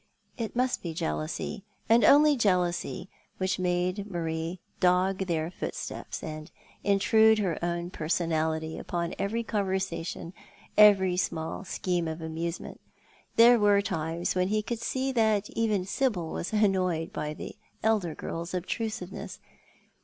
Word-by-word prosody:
It 230 -2 -4
must 250 +1 +1
be 165 -3 -5
jealousy, 75 - -3 0.2
and 230 +1 +5
only 295 +5 +7
jealousy, 180 -5 0 0.3
which 185 0 -1
made 180 +3 -1
Marie 165 0 -3 0.2
dog 185 +1 +2
their 165 -1 -1
footsteps, - - -5
and 155 0 -6 0.3
intrude 220 +2 +5
her 185 -6 -1
own 175 0 -2
personality 160 -1 -1
upon 170 0 -3
every 225 +4 -1
conver 200 -4 -1
sation, 170 -2 -4 0.4
every 195 -4 +6
small 160 -1 -2
scheme 180 -2 -1
of 160 +1 -4
amusement. 165 +1 -5 0.5
There 235 +1 +7
were 205 -1 +4
times 165 0 -2
when 185 0 +1
he 215 +2 0
could 230 +1 -4
see 265 +1 -1
that 220 -4 +2
even 215 -5 0
Sibyl 195 -7 -1
was 175 - -4
annoyed 185 -6 +1
by 150 0 -3
the - - -8 0.3
elder 210 -7 +1
girl's 170 +2 -5
obtrusivencss. 190 +1 -4
185 Hz, 130 wpm, -28 LUFS, 170-210 Hz, 0.5 s, only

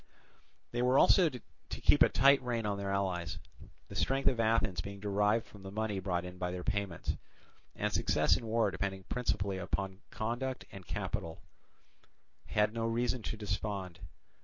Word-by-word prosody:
They 120 - -1
were 125 +2 +4
also 175 +2 +6
to 125 -5 -8 0.3
keep - - +3
a - - +8
tight 140 0 +5
rein 120 -3 -2
on 100 -1 -1
their 100 0 -3
allies—the 95 -3 -4
strength 135 +1 +1
of 125 - -2
Athens 110 -6 +2
being 100 +2 -7
derived 105 +2 +2
from 105 - -14
the 95 - -7
money 105 0 -2
brought 90 -2 -1
in 90 0 -9
by 90 0 -1
their 90 0 -4
payments, 100 -5 -1 0.6
and - - -1
success - - +3
in 115 - -4
war 115 +1 +2
depending 95 -1 -3
principally 100 -6 -1
upon 95 +1 -3
conduct 120 +4 -3
and 95 -3 -10
capital, 80 -1 -4 1.0
had 105 0 +2
no 115 0 -1
reason 120 +2 0
to 110 - -4
despond. 100 -3 -3
105 Hz, 160 wpm, -33 LUFS, 95-115 Hz, 1.0 s, a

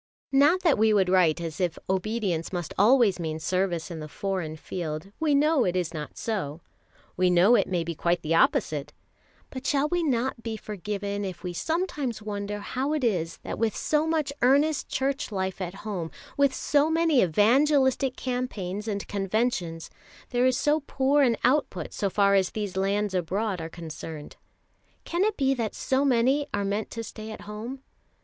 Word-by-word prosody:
Not 290 +7 +4
that 330 - +3
we 220 0 +4
would 190 -3 +3
write 180 -3 +4
as 165 +1 -5
if 175 -2 0
obedience 190 -3 -1
must 175 -3 -4
always 215 -3 +4
mean 160 -2 -3
service 180 -1 -1
in 165 - -5
the 155 - -6
foreign 185 -2 -3
field. 160 +2 -5
We 305 -3 +2
know 300 -1 +4
it 180 -3 0
is 180 -2 -1
not 150 -2 -6
so: 175 -9 -3 0.5
we 185 0 +3
know 180 +6 +5
it - - +4
may 175 -3 0
be 170 0 -4
quite 170 +2 0
the 160 +1 0
opposite; 150 -3 +2 0.6
but 260 0 -6
shall 285 0 +2
we 350 +3 0
not 260 -5 0
be 225 -1 -4
forgiven 205 0 -4
if 185 -2 -6
we 180 -1 -4
sometimes 300 - -2
wonder 205 -1 -4
how 265 +7 -2
it 305 -3 -1
is 175 -8 0
that - - -5
with 225 -2 +1
so 305 +1 +1
much 310 -3 0
earnest 285 +4 +3
Church 270 -2 -1
life 190 -1 -3
at 180 0 -4
home, 185 -6 -3 0.3
with 280 -1 +3
so 290 +3 +2
many 325 -4 +3
evangelistic 265 - +3
campaigns, 220 -6 -3
and 200 -2 -3
conventions, 195 -4 -1 0.4
there 245 0 +3
is 255 0 +2
so 295 +3 +2
poor 280 0 +1
an 240 -5 +3
output 250 - +1
so 200 - -1
far 200 +1 +3
as 190 -2 +3
these 205 -3 -3
lands 200 +1 0
abroad 190 +2 -1
are 160 - -5
concerned? 160 -2 -8 0.7
Can 345 +2 0
it 430 0 0
be 270 -1 +2
that 230 -5 -3
so 265 +1 +1
many 265 +2 +2
are 200 0 -1
meant 205 +2 -2
to 230 - -5
stay 220 -1 -8
at 215 - -8
home? 230 +6 -7
210 Hz, 180 wpm, -26 LUFS, 180-265 Hz, 0.7 s, know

